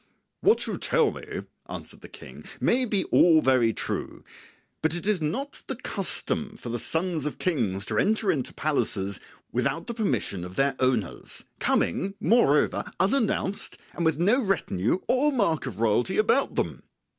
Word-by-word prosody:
"What 430 - +3
you - - -4
tell - - +2
me," - - -7 0.3
answered - - -8
the - - -11
King, - - -12 0.2
"may 255 +2 +2
be 205 -5 0
all 165 -2 +6
very 130 -5 +3
true; - - -4 0.6
but 160 +1 +2
it 175 - -3
is 205 -5 +1
not 260 - -3
the - - -3
custom 215 -1 -1
for 125 - -8
the 120 +1 -2
sons 160 +1 0
of 150 - -5
kings 105 - 0
to - - -1
enter 215 -2 +2
into 140 -7 -2
palaces 100 - 0 0.3
without - - -1
the 235 - -4
permission 200 - -1
of 90 +1 -8
their 135 0 +2
owners, 125 -8 -1
coming, 195 - +1
moreover, 175 - +3 0.2
unannounced 205 -2 0 0.2
and 170 - -3
with 160 -3 +2
no 210 - +3
retinue 115 - 0
or 285 +4 +3
mark 185 - 0
of 110 -5 -7
royalty 115 - +1
about 215 +6 +2
them. - - -2
165 Hz, 160 wpm, -26 LUFS, -, 0.6 s, all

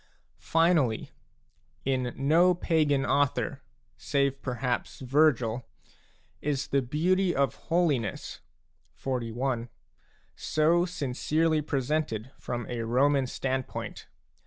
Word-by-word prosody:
Finally, 165 -9 +2 0.7
in 130 -2 0
no 165 +6 +4
pagan 155 -5 +1
author, 140 -1 +1 0.4
save 140 -1 0
perhaps 125 -1 -2
Vergil, 125 -4 +2 0.7
is 145 -1 -1
the 140 - +2
beauty 175 +8 +1
of 140 -1 +2 0.2
holiness 155 - 0 0.6
(XLI.) 120 -1 -2 0.7
so 165 +3 +2
sincerely 155 0 0
presented 135 -4 -2
from 120 -2 -4
a 120 -1 -3
Roman 130 +4 +2
standpoint. 130 +1 -4
140 Hz, 85 wpm, -28 LUFS, 125-155 Hz, 0.7 s, no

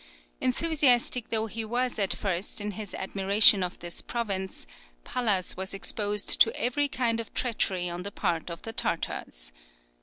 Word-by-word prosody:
Enthusiastic 250 - +3
though 220 -1 +1
he 225 +1 -5
was 245 +2 -1
at 195 -2 +1
first 190 +1 -2
in 210 0 -3
his 205 0 -7
admiration 195 +1 +5
of 180 -1 -3
this 175 0 -4
province, 195 - -4 0.4
Pallas 210 -7 0
was 190 +1 -4
exposed 205 +1 0
to 225 - +7
every 285 +4 +1
kind 235 -4 -1
of 230 - -7
treachery 190 -7 0
on 175 0 -4
the 200 +2 -5
part 170 -3 -2
of 170 -1 -8
the 225 - -6
Tartars. - - -2
205 Hz, 155 wpm, -27 LUFS, 190-230 Hz, 0.4 s, to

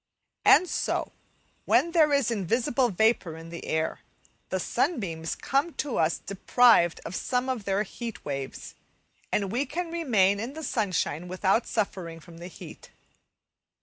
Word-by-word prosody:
And 365 - +7
so, - - -1 0.5
when 340 - +3
there 315 -3 +4
is 280 -4 +2
invisible 235 +5 +1
vapour 200 -5 +1
in 165 0 -10
the 170 - -8
air, 160 0 -1 0.5
the - - -1
sunbeams 165 - -1
come 285 +5 -1
to 280 -5 -2
us 160 +1 +2
deprived 200 -3 +3
of 185 - -5
some 250 0 -1
of 250 -6 -3
their 195 +1 +1
heat 225 0 -8
waves, 135 -2 -5 0.6
and 200 -2 0
we 255 +6 -1
can 340 +2 -4
remain 215 - +2
in 235 +6 -4
the 315 +1 -7
sunshine 180 - -1
without 190 +5 +1
suffering 185 -6 -3
from 165 0 -14
the 175 - -7
heat. 180 - -12
210 Hz, 150 wpm, -27 LUFS, 175-255 Hz, 0.6 s, And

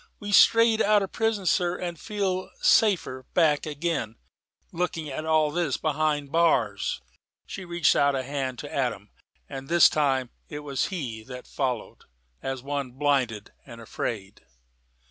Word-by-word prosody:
We've 205 0 -5
strayed 225 +1 +6
out 210 -1 +4
of 195 - -5
prison, 225 -3 -1
sir, 175 -1 +1
and 175 -1 -4
shall - - -17
feel 195 -3 -2
safer 170 - +2
back 155 -3 +3
again, 150 -7 -2 0.6
looking 165 -2 -3
at 155 +4 -5
all 155 -1 +2
this 170 -5 -1
behind 150 -2 -1
bars." 125 - +1 0.4
She 190 - -7
reached 170 -2 +2
out 140 -1 +3
a 130 - -2
hand 135 -2 -3
to - - -9
Adam: - - -2 0.4
and 135 0 -8
this 170 0 +7
time 135 -4 0 0.2
it 150 0 -6
was 140 -2 -2
he 125 - -5
that 125 0 -9
followed, 125 -5 -4 0.4
as 135 -1 -4
one 140 -3 -4
blinded 130 -6 0
and 120 -3 -12
afraid. 105 -3 -5
150 Hz, 150 wpm, -26 LUFS, 130-175 Hz, 0.6 s, this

